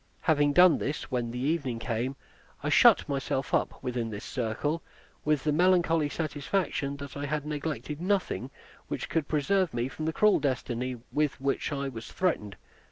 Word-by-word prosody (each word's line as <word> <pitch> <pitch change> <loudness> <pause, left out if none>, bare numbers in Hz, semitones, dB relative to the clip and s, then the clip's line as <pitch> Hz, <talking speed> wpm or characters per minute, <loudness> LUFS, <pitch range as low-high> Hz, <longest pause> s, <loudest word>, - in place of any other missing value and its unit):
Having 145 -2 +3
done 180 0 +7
this, 145 0 -3
when 120 -2 -1
the 120 - -5
evening 135 -2 0
came, 120 +3 -2 0.5
I - - 0
shut - - +6
myself 135 -1 -2
up - - 0
within 120 -3 -2
this 105 -2 -6
circle, 135 +7 -2 0.4
with 150 -3 +1
the 150 - +2
melancholy 165 -2 +3
satisfaction 145 -2 -2
that 140 -1 -8
I 145 0 -3
had 150 0 -2
neglected 150 0 -4
nothing 185 -9 0 0.4
which - - -4
could 160 -3 0
preserve 165 +1 +1
me 120 +1 0
from 155 +3 -5
the 160 - 0
cruel 210 +3 +4
destiny 130 -2 -2
with 150 -2 0
which 135 +3 -1
I 140 -1 -2
was 115 -4 -7
threatened. 110 - -1
145 Hz, 165 wpm, -29 LUFS, 130-160 Hz, 0.5 s, done